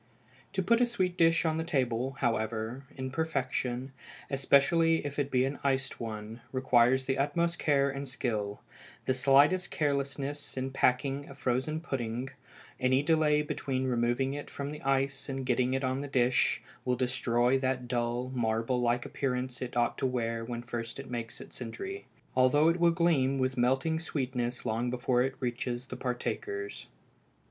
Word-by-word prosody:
To 190 - 0
put 235 +5 +3
a 245 - +5
sweet 185 -7 -1
dish 165 -1 +4
on 160 -1 +1
the 160 - -1
table, 130 -5 0
however, 115 +1 -1
in 130 -1 -4
perfection, 130 -4 -2 0.4
especially 160 +5 +3
if 145 0 -3
it 140 -1 0
be 130 -1 +3
an 135 +1 -3
iced 135 -1 0
one, 110 0 -6
requires 130 0 +3
the 135 0 0
utmost 170 +4 +1
care 140 -2 +3
and 135 0 -5
skill; 110 -6 -2 0.4
the 130 - +2
slightest 140 +8 +4
carelessness 140 -1 -2
in 130 +1 -2
packing 135 +2 +1
a 140 - -10
frozen 135 +4 -1
pudding, 125 -4 -3 0.5
any 130 +2 +3
delay 150 -1 +3
between 135 -3 -2
removing 120 +2 +1
it 145 0 -6
from 140 0 -5
the 150 - -8
ice 135 +1 0
and 135 -1 -3
getting 125 +1 +2
it 135 - -1
on 130 +1 0
the 145 - -4
dish, 125 -2 +2 0.2
will 125 -1 +1
destroy 125 0 +2
that 130 -1 -1
dull, 120 +1 -1
marble 115 +1 0
like 120 0 +1
appearance 130 -1 -2
it 125 -1 -4
ought 120 -1 +1
to 130 - +2
wear 115 -2 -1
when 120 0 -5
first 115 -1 -5
it 135 - -8
makes 115 -2 -4
its - - -10
entry, 390 - -6 0.3
although 140 +5 +5
it 170 +1 +1
will 170 0 +5
gleam 165 -6 +2
with 130 0 0
melting 130 +6 +2
sweetness 125 -6 -2
long 115 +2 0
before 125 0 +1
it 130 +1 0
reaches 120 0 -2
the - - -7
partakers. 405 - -4
130 Hz, 165 wpm, -30 LUFS, 125-145 Hz, 0.5 s, a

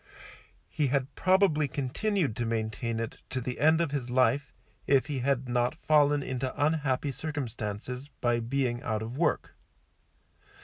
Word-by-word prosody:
He 150 - +1
had 135 +1 0
probably 185 -6 +3
continued 145 - -1
to 120 - -1
maintain 115 0 -2
it 115 -1 -4
to 130 - -2
the 125 0 -4
end 160 +2 +5
of 165 -4 0
his 135 -4 -3
life 130 +2 +2 0.4
if 135 -1 +4
he 145 -3 -3
had 130 0 0
not 120 +3 +1
fallen 145 -3 +3
into 130 0 -2
unhappy 145 -2 +1
circumstances, 125 -3 -5
by 120 -1 +2
being 120 0 -1
out 110 -5 -2
of 115 +3 -6
work. 155 +1 0
135 Hz, 145 wpm, -29 LUFS, 120-145 Hz, 0.4 s, end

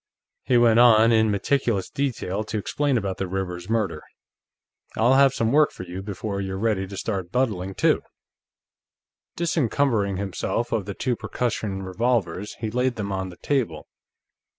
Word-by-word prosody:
He 125 - +2
went 120 -1 +5
on, 115 -1 +7
in 110 -1 +4
meticulous 105 -1 0
detail, 110 -7 -2
to 110 - -3
explain 140 +6 0
about 100 -4 -2
the 95 - -2
Rivers 90 -1 -4
murder. 110 -3 0 1.0
"I'll 120 +4 +4
have 135 0 +6
some 115 -1 0
work 150 +1 +5
for - - -8
you, 90 +1 -6
before 100 0 -4
you're 95 0 -4
ready 100 -2 0
to 100 0 -8
start 95 -5 -3
buttling, 95 -7 -1
too." - - +2 1.4
Disencumbering 130 - +1
himself 100 +4 -2
of 110 -5 0
the 100 - -5
two 125 -1 -1
percussion 105 -6 -3
revolvers, 100 -1 -1
he 110 -2 -4
laid 125 +1 0
them 100 -2 -4
on 95 -1 -2
the 90 - -12
table. 135 -5 -2
110 Hz, 155 wpm, -24 LUFS, 95-120 Hz, 1.4 s, on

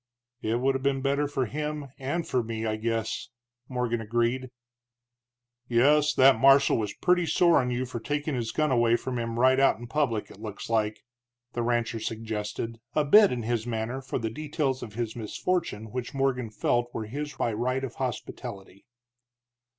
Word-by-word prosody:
"It 110 +1 0
would 130 +3 +2
have 135 - -2
been 135 -1 0
better 140 +1 +1
for 135 -2 -1
him, 150 +3 -4
and 150 +6 -2
for 125 - +1
me, 115 -1 -4
I 110 -1 0
guess," 115 0 -2 0.4
Morgan 125 -2 -1
agreed. 120 +3 0 1.2
"Yes, 145 +5 +4
that 130 -3 +6
marshal 135 -1 +6
was 105 -2 -2
purty 180 -1 +2
sore 170 +2 +4
on 125 - -2
you 125 +1 -1
for 120 -1 -5
takin' 145 +5 -2
his 115 -3 -2
gun 155 +3 +1
away 120 -2 +4
from 125 0 -3
him 115 0 -3
right 130 +2 +4
out 135 - +4
in 120 - -9
public, 120 -4 -1
it - - -14
looks 110 +1 -7
like," 110 -1 0 0.5
the 120 - -2
rancher 120 -1 0
suggested, 110 +1 -4 0.2
a 150 - +3
bid 205 +8 +7
in 120 -2 -2
his 120 0 -1
manner 115 +3 -2
for 135 - -3
the 110 -3 -3
details 145 -1 -2
of 105 -3 -8
his 115 -2 -3
misfortune 110 - -2
which 125 +1 -5
Morgan 130 -4 0
felt 120 +3 0
were 110 - -3
his 145 +6 -5
by 115 - -1
right 130 +4 -1
of 135 - -4
hospitality. 95 +1 -6
120 Hz, 180 wpm, -27 LUFS, 115-135 Hz, 1.2 s, bid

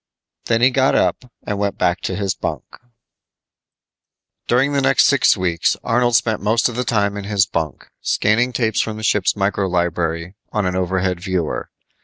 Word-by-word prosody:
Then 115 0 +1
he 130 - +6
got 130 +1 +2
up 125 - 0
and 105 -2 -3
went 100 -1 -1
back 90 0 0
to 95 - -3
his 100 -2 -1
bunk. - - -4 1.8
During 135 +4 +2
the 140 - +1
next 135 0 +4
six 140 -5 +4
weeks, 90 -3 0
Arnold 120 0 +2
spent 110 -1 +1
most 110 +3 +2
of 120 - -6
the 125 - -1
time 105 -4 0
in 100 - -6
his 100 -2 +2
bunk, 80 -6 -4
scanning 115 +4 +1
tapes 110 -3 0
from 110 -1 -4
the 110 - -8
ship's 105 -1 +2
micro 100 -1 0
library 85 -1 -1 0.2
on 105 -2 -1
an 90 0 -1
overhead 95 0 -1
viewer. 90 -3 -3
100 Hz, 175 wpm, -19 LUFS, 90-115 Hz, 1.8 s, he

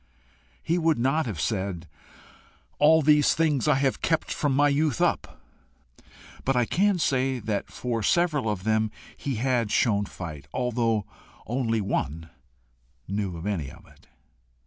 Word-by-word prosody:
He 170 +2 +1
would 165 -2 +2
not 135 +5 +1
have 100 -8 -4
said: 95 -5 -2 0.9
"All 160 +1 +5
these 150 0 +4
have 150 -7 +1 0.3
I - - -31
kept 160 -1 0
from 145 -3 0
my 145 +1 +4
youth 145 -2 +1
up;" - - 0 1.0
but 135 - +1
I 120 -1 +3
can 200 - +2
say 135 -4 +1
that 105 -3 -3
for 120 -2 -3
several 150 - +1
of 100 -3 -3
them 110 0 +1 0.3
he 140 -2 -4
had 120 -1 0
shown 105 -1 +2
fight, 75 -7 -8
although 115 -4 0 0.4
only 115 -2 -1
One 80 -4 -3 0.8
knew 100 -3 -3
anything 85 -10 -2
of 95 +3 -18
it. 75 -4 -22
120 Hz, 140 wpm, -26 LUFS, 100-145 Hz, 1.0 s, All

